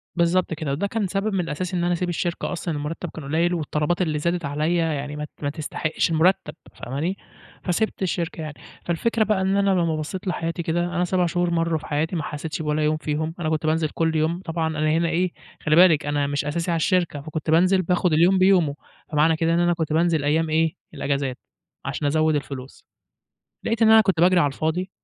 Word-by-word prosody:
بالضبط 170 0 +2
كده، 155 -2 -3
وده 165 +9 -1
كان 215 -1 -1
سبب 195 +3 -1
من 195 - +1
الأساس 175 +1 -3
إن 175 -1 0
أنا 175 0 +2
أسيب 175 +1 -1
الشركة 175 0 -2
أصلًا 170 -1 -3
المرتب 155 +3 -4
كان 155 - -9
قليل، 165 +5 +1
والطلبات 155 +1 -1
اللي 155 -4 0
زادت 170 +1 -1
عليَّ 150 +4 0
يعني 150 -3 -1
ما 150 - -4
ت - - -16
ما 145 - +1
تستحقش 155 +1 -2
المرتب، 160 -1 +2 0.2
فاهماني؟ 155 +10 -3 0.5
فسِبت 200 +5 -1
الشركة 175 -3 -2
يعني. 155 -1 -5 0.3
فالفكرة 220 +7 +1
بقى 210 -2 +1
إن 190 +1 +1
أنا 200 0 +2
لما 170 -4 +1
بصّيت 180 +5 -5
لحياتي 170 -1 -2
كده، 175 +1 0
أنا 175 0 -1
7 180 0 +1
شهور 175 0 0
مرّوا 165 -1 +1
في 155 - -12
حياتي، 160 +4 -1
ما 160 - -2
حسيتش 155 +2 -5
بولا 150 0 0
يوم 155 +1 +2
فيهم، 155 +1 -2
أنا 155 - -1
كنت 155 0 -1
بانزل 155 0 +1
كل 160 -1 -1
يوم 160 +3 0
طبعًا 165 -2 -2
أنا 155 -1 0
هنا 165 +1 +2
إيه 175 +2 0 0.3
خلّي 155 -1 +2
بالِك 165 -4 +6
أنا 145 -1 0
مش 145 0 -2
أساسي 170 +3 -1
على - - +1
الشركة، 170 -4 +1
فكنت 155 +1 -5
بانزل 185 +4 +4
باخد 180 -1 +1
اليوم 175 +5 +4
بيومه، 185 -6 +4 0.4
فمعنى 155 +2 +3
كده 165 +1 +1
إن 170 - +2
أنا 175 0 +3
كنت 160 -2 -2
بانزل 165 -2 +2
أيام 160 +3 +1
إيه؟ 160 0 +1 0.2
الإجازات. 140 -2 -2 0.5
عشان 145 +1 -2
أزوّد 155 +1 +2
الفلوس. 135 -2 -6 0.8
لقيت 230 +1 0
إن 220 - +6
أنا 220 - +8
كنت 190 -6 +1
باجري 180 0 +5
على 145 - +3
الفاضي. 160 +6 -2
165 Hz, 210 wpm, -23 LUFS, 155-180 Hz, 0.8 s, أنا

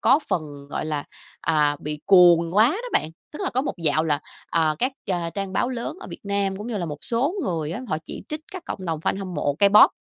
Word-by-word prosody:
có 270 - +5
phần, 145 -4 -3
gọi - - -2
là, 150 -2 -2 0.4
à, 150 -2 +2
bị 150 0 -5
cuồng 175 -2 +6
quá 225 +4 +6
đó 465 +10 -4
bạn. 155 - +1 0.2
Tức 300 - -8
là - - 0
có 255 - +1
một - - -3
dạo 155 0 +3
là, 150 -2 +1 0.3
à, 160 -2 +2
các, 255 +2 +1 0.2
a, 170 -2 -1
trang 195 +1 -4
báo 245 - +1
lớn 255 +5 -4
ở - - -8
Việt - - -8
Nam, 200 -1 0
cũng 210 - -6
như 230 -4 -2
là 175 - -2
một 150 -2 -5
số 255 +9 0
người 160 -3 -2
á, 210 - -4
họ 155 - 0
chỉ - - -7
trích 305 0 -3
các 370 -2 -6
cộng - - -5
đồng 160 -2 -2
fan 190 - 0
hâm 190 -2 -5
mộ 145 -2 0
K-pop 200 +1 +8
180 Hz, 250 wpm, -24 LUFS, 155-230 Hz, 0.4 s, K-pop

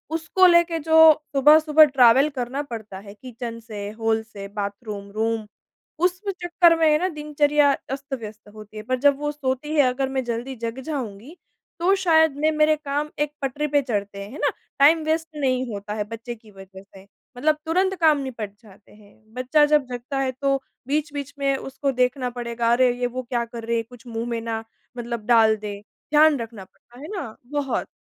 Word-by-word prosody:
उसको 325 +4 +2
लेके 340 -1 +4
जो 320 +1 +7 0.2
सुबह-सुबह 305 +2 +6
ट्रैवल 265 0 +5
करना 265 0 -4
पड़ता 220 -7 -8
है 200 0 -12
किचन 235 +1 -8
से, 210 -3 -7
हॉल 225 0 0
से, 205 -3 -10
बाथरूम, 200 0 -6
रूम 220 +1 -1 0.6
उस 360 0 +2 0.2
चक्कर 345 -1 +4
में 320 - +4
है 300 - +4
ना 365 - +1
दिनचर्या 295 -2 +2 0.2
अस्त-व्यस्त 260 -7 -7
होती 215 0 -12
है। 215 - -6
पर 255 +3 -1
जब 285 +1 +4
वो 295 +1 -2
सोती 290 +1 -3
है, 295 - +6
अगर 265 +1 -1
मैं 265 -1 -2
जल्दी 240 +2 -4
जग 230 +1 -5
जाऊँगी 260 - -6 0.4
तो 360 +3 +3
शायद 320 -4 +4
मैं 310 +1 +2
मेरे 305 0 +3
काम 295 0 -3
एक 295 0 0
पटरी 280 +2 -2
पे 290 0 +2
चढ़ते 200 -6 -4
हैं, 200 - -10
है 280 - -9
ना। - - +2 0.3
टाइम 310 +3 +5
वेस्ट 320 +1 0
नहीं 260 -3 0
होता 205 0 -6
है 210 -1 -2
बच्चे 230 +3 -7
की 220 -1 -19
वजह 195 -1 -13
से, 195 -1 -17 0.3
मतलब 305 +4 +2
तुरंत 375 +4 +1
काम 310 -2 +5
निपट 230 -7 -6
जाते 205 -2 -19
हैं। 215 +1 -22
बच्चा 255 +5 +3
जब 295 -2 +3
जगता 250 +2 -5
है 265 -1 0
तो 275 +2 0 0.3
बीच-बीच 285 -1 -3
में 275 -1 +1
उसको 270 +1 -3
देखना 250 0 0
पड़ेगा, 235 -1 -2
अरे! 250 +1 +4
ये 245 - +1
वो 255 +1 -5
क्या 240 -1 -2
कर 230 0 -9
रही 235 0 0
है, 230 - -1
कुछ 245 +1 -16
मुँह 230 0 -4
में 235 -1 -2
ना 225 -1 -4 0.3
मतलब 235 -2 -5
डाल 225 -2 +5
दे। 205 -1 -6
ध्यान 300 +7 +2
रखना 225 -4 -7
पड़ता 240 +5 -21
है 295 - -8
ना 235 - -6 0.2
बहुत। 290 -3 -2
255 Hz, 195 wpm, -23 LUFS, 225-295 Hz, 0.6 s, जो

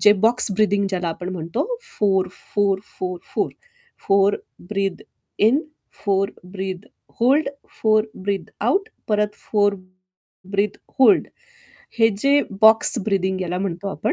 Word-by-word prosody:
जे 210 - +7
box 240 -1 +3
breathing 205 0 +2
ज्याला 180 -3 -2
आपण 175 +2 -5
म्हणतो 175 - -2 0.3
4, 190 -3 +2 0.3
4, 200 -2 +2 0.2
4, 180 -1 -3 0.2
4. - - 0 0.6
4 195 +1 +4 0.3
breath 195 -2 -1 0.4
in. 235 +8 +4 0.4
4 195 0 +1 0.2
breath 190 -1 -5 0.3
hold. 275 +6 +4 0.3
4 215 -1 +4
breath 195 0 -3
out. 400 +2 +1 0.2
परत 210 -1 +1 0.2
4 205 -1 +3 0.8
ब्रीथ 200 0 0 0.2
होल्ड 360 +9 +6 0.7
हे 225 - +6
जे 280 +4 +4 0.2
बॉक्स 220 +2 +6
ब्रिथिंग 190 -2 0
याला 180 0 -2
म्हणतो 195 0 -3
आपण 155 - -1
200 Hz, 125 wpm, -22 LUFS, 190-215 Hz, 0.8 s, जे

